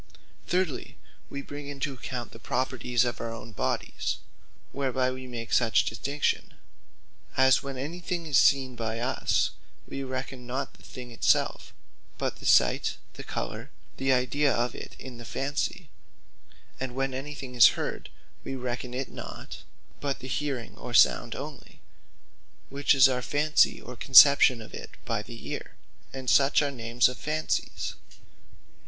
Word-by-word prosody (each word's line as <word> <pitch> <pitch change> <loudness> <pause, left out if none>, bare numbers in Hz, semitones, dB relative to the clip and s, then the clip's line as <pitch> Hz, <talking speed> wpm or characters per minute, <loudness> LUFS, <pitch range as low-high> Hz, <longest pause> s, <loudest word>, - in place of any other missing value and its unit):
Thirdly, 180 -4 -1 0.3
we 140 0 -6
bring 145 0 -8
into 140 0 -3
account, 125 -1 -6
the - - -12
Properties 125 -1 0
of 120 - -3
our 115 0 -3
own 115 0 -8
bodies, 105 - -2 0.5
whereby 130 -2 0
we 130 0 -7
make 120 -2 -6
such 115 -3 +4
distinction: 140 +7 -1 0.8
as 130 0 +5
when 135 -1 -6
any 150 +7 -5
thing 175 -1 -3
is 145 -4 +4
Seen 135 -3 +4
by 115 -1 -3
us, 125 +3 +1 0.4
we 135 - -5
reckon 130 -1 -5
not 130 +2 -3
the - - -21
thing 125 -2 -10
it 115 - -11
selfe; - - +2 0.5
but - - -2
the - - -5
Sight, - - +4 0.2
the - - -9
Colour, - - -5 0.3
the 135 0 +1
Idea 135 +3 +2
of 120 +1 0
it - - -9
in 125 -3 -10
the - - -8
fancy: 135 +6 -3 0.9
and 130 -2 -4
when 135 0 -1
any 140 +3 -5
thing 130 -3 -8
is 120 -4 +7
Heard, - - -4 0.3
wee 135 - -4
reckon 125 -1 -4
it 135 +1 -3
not; - - -8 0.4
but 140 -1 -2
the 130 - -9
Hearing, 135 -3 -3
or 120 -1 -5
Sound 115 +1 +5
onely, 145 +2 -9 0.9
which 140 +1 +2
is 135 0 +8
our 125 -1 -1
fancy 150 +4 +3
or 125 - -9
conception 135 -1 +7
of - - -14
it - - -9
by - - -1
the - - -10
Eare: - - -7 0.4
and 130 -1 -7
such 140 +3 +5
are 145 - 0
names 120 -2 +2
of 125 - -6
fancies. 155 +1 -2
130 Hz, 160 wpm, -28 LUFS, 125-140 Hz, 0.9 s, is